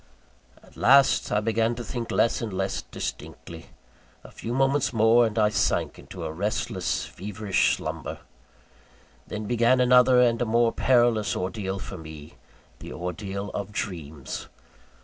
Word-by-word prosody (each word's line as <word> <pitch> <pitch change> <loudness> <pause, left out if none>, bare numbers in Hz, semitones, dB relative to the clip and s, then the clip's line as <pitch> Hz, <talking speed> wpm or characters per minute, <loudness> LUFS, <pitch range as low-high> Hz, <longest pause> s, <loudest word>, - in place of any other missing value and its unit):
At - - -20
last 135 +2 +4
I 105 - +2
began 115 +2 0
to 120 - -6
think 120 +1 -5
less 115 - +1
and 115 -3 -4
less 95 +1 -2
distinctly - - -7 0.6
a - - -13
few 115 - -6
moments 135 +2 +1
more, 115 +1 +4
and 110 0 -7
I 105 -1 +4
sank - - 0
into 90 -3 -9
a 80 - -3
restless, 100 +6 -2
feverish 100 +1 -1
slumber. - - -5 1.1
Then 105 0 -5
began 120 +3 +3
another, 125 0 +5
and 120 -1 +3
a - - +2
more 115 +1 +2
perilous 120 -5 +2
ordeal 95 +1 -3
for 95 -2 -8
me 80 -2 -11 0.5
the - - -9
ordeal 95 +3 -5
of 100 0 -5
dreams. 80 -9 -5
110 Hz, 145 wpm, -25 LUFS, 95-120 Hz, 1.1 s, another